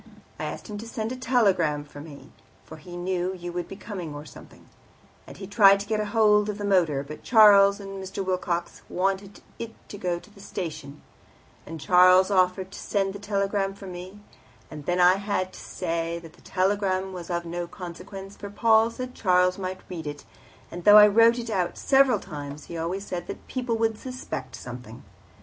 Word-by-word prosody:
I - - -3
asked - - -6
him 210 -2 -6
to 225 - -8
send 225 0 -4
a - - -3
telegram 205 - +2
for 145 0 -12
me, 145 -2 -12 0.3
for 160 - -11
he 175 +2 -10
knew 180 +1 -2
you 175 -1 -7
would 175 -1 -3
be - - -8
coming 185 -7 -7
or 145 +1 -8
something; - - -15 0.6
and - - -11
he 195 - -7
tried 200 -1 +6
to 200 - -5
get 215 0 -1
hold 210 -1 +3
of 205 - -3
the 205 - -4
motor, 170 -8 +2
but 150 +2 -9
Charles 200 -3 +6
and 195 -1 -7
Mr. 190 +1 -5
Wilcox 175 -2 -2
wanted 195 +2 -2 0.2
it 230 -1 -6
to 205 - -8
go 175 -2 -1
to 190 - -15
the 205 - -18
station; 150 -7 -7 0.6
and 165 0 -7
Charles 185 +4 +5
offered 185 0 +2
to - - -9
send 195 -2 -1
the 200 - -8
telegram 200 -1 -1
for 200 - -11
me, 185 +2 -9 0.5
and 150 -2 -9
then 180 0 +1
I 180 +1 +6
had 195 -2 -2
to - - -11
say 170 -1 -3
that 165 -2 -12
the - - -21
telegram 190 0 0
was 180 -1 -8
of 170 -1 -2
no 175 +1 -4
consequence, 185 +3 -9
for 200 - -8
Paul 220 +1 +4
said 255 +2 -7
Charles 180 -3 +2
might 185 0 -4
read 165 -4 -6
it, 145 0 -7 0.5
and 175 0 -7
though 205 +2 +9
I 210 - +10
wrote 230 +3 +5
it 235 -1 -5
out 180 -4 -1
several 270 -4 +4
times, 145 -4 -8
he 170 - -9
always 175 +5 -3
said 175 -3 -5
people 245 -3 -2
would 225 -1 0
suspect 250 - -6
something. 120 -1 -9
190 Hz, 195 wpm, -26 LUFS, 175-205 Hz, 0.6 s, I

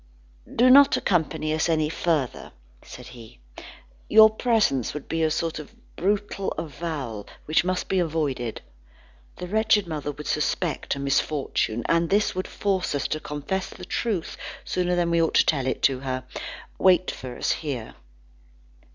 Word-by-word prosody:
"Do 250 +2 +6
not 280 +1 +7
accompany 155 -3 0
us 160 +2 0
any 155 -2 +2
further," 155 -4 -2 0.3
said - - -11
he; 115 - -13 0.7
"your 220 0 +8
presence 220 - +1
would 150 - -6
be 165 +1 -1
a 160 - +3
sort 165 0 -2
of 150 - -11 0.2
brutal 200 +1 -1
avowal 145 -9 -5 0.2
which 155 +2 +2
must 185 0 -1
be 190 - +1
avoided. 150 -9 -2 0.7
The 180 - -6
wretched 215 +1 +2
mother 150 -3 -4
would 150 +1 -10
suspect 155 +1 -1
a - - -6
misfortune, 140 -4 0
and 165 0 +2
this 205 +2 +2
would 185 0 -3
force 190 -6 -1
us 140 - -1
to 155 - -1
confess 155 +7 -4
the 180 - -10
truth 200 -4 -2 0.3
sooner 180 -1 0
than 175 -1 +1
we 170 0 +3
ought 165 - +1
to - - +5
tell 135 -4 +1
it 130 - -2
to 135 -2 +3
her. 130 -1 -3 0.6
Wait 185 -1 +4
for 125 -2 -8
us - - 0
here." 135 -8 -4
160 Hz, 160 wpm, -25 LUFS, 140-185 Hz, 0.7 s, your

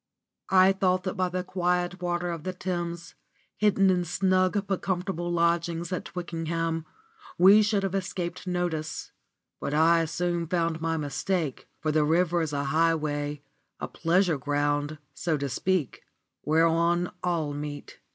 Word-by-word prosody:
I 190 0 +6
thought 185 -1 +1
that 185 - -2
by 185 -2 0
the 180 0 -2
quiet 180 0 -1
waters 175 0 -1
of 165 -2 -7
the 185 - -3
Thames, 175 -2 -4 0.4
hidden 195 -2 +3
in 180 -1 +1
snug 185 +3 +1
but 195 -2 -2
comfortable 180 -2 -2
lodgings 170 0 0
at 180 - -3
Twickenham, 165 -2 -3 0.5
we 195 +4 +8
should 210 -1 +1
have 195 -1 -1
escaped 185 -2 -3
notice; 175 -3 -2 0.5
but 145 - -2
I 165 +1 +4
soon 170 +1 -1
found 165 -1 0
my 165 0 0
mistake, 155 +1 -2
for 155 - 0
the 155 0 +3
river 170 +2 +2
is 160 -2 -2
a 140 -1 -1
highway, 150 -1 0 0.4
a - - -3
pleasure 170 -1 +1
ground 145 +2 0 0.2
(so 160 -2 -1
to 140 0 -2
speak) 175 +1 -1 0.4
whereon 165 +3 +2
all 165 -5 0
meet. 145 0 -7
170 Hz, 145 wpm, -27 LUFS, 160-180 Hz, 0.5 s, we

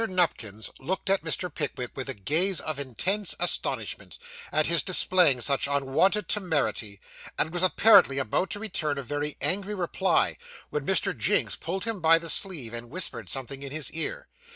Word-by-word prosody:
Nupkins 115 - -1
looked 190 +7 -2
at 195 - +2
Mr. 170 +2 -1
Pickwick 130 -5 -4
with 135 0 -5
a 135 - -3
gaze 160 - +1
of 155 -2 -4
intense 180 - 0
astonishment, - - -1 0.3
at 155 - +2
his 170 0 +3
displaying 180 -7 +4
such 140 +2 +2
unwonted 140 +8 +1
temerity; 135 - -1 0.4
and 160 - -1
was 175 - -1
apparently 185 -6 +5
about 140 - -1
to 205 - -4
return 165 -9 -3
a 140 - -4
very 145 +3 -3
angry 200 +2 -1
reply, 185 -1 +1 0.3
when - - -4
Mr. - - +2
Jinks - - +1
pulled 185 +3 -4
him 225 -4 -3
by 165 +1 +6
the 165 0 +1
sleeve, 150 - -1
and 120 0 -6
whispered 120 - -5
something 135 +5 -5
in 140 -1 -7
his 150 -3 0
ear. 160 - -3
160 Hz, 170 wpm, -26 LUFS, 135-185 Hz, 0.4 s, by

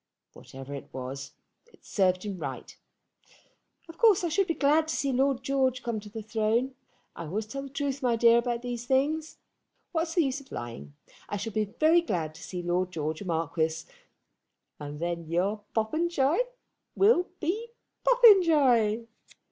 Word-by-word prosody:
Whatever 135 +1 -10
it 140 - -8
was, 130 +2 -6 0.4
it - - -24
served 185 -2 +1
him 195 -3 -5
right. - - -6 1.1
Of 330 0 -13
course 430 -6 +5
I 345 - 0
should 380 +4 +1
be 330 - -1
glad 305 +2 +3
to 315 - -2
see 275 - 0
Lord 265 0 +1
George 260 -1 0
come 230 -2 -2
to 210 0 -11
the 220 +1 -7
throne. 220 +4 0 0.4
I 170 - -6
always 205 +8 -3
tell 275 +6 -6
the 275 - -8
truth, 280 0 -3
my 245 -3 +2
dear, 235 +1 +5
about 235 0 -2
these 240 -1 -5
things. 300 +4 0 0.5
What 330 -1 0
is 325 - -7
the 345 - +4
use 275 0 -2
of 270 - -20
lying. 70 -13 -7 0.3
I 205 - -2
shall 205 +2 -5
be 215 0 +1
very 325 +2 +5
glad 170 - -2
to 165 - -14
see 180 -2 -6
Lord 175 +1 0
George 155 0 -3
a - - -6
marquis, 160 -1 -1 1.0
and 145 0 -7
then 170 -1 -3
your 195 +6 -1
Popenjoy 290 +6 +1 0.6
will 390 -3 +4
be 400 +9 -2 0.4
Popenjoy. 300 - +5
235 Hz, 170 wpm, -28 LUFS, 180-300 Hz, 1.1 s, course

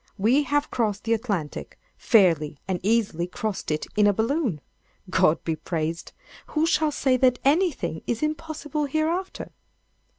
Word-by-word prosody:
We 230 +8 +3
have 290 +1 0
crossed 210 -4 -1
the 230 - +1
Atlantic—fairly 180 - 0
and 185 -2 -1
easily 200 -5 +1
crossed 205 +2 -4
it 155 0 -1
in 210 -1 +4
a 205 - +4
balloon! 225 - 0 0.5
God 185 -4 +3
be 160 - -1
praised! 165 +1 -4 0.3
Who 310 +1 +1
shall 310 -2 +2
say 265 -3 +1
that 250 -1 +3
anything 280 - +1
is 235 +4 -1
impossible 305 -1 -3
hereafter?" 315 +6 -2
230 Hz, 135 wpm, -25 LUFS, 180-295 Hz, 0.5 s, in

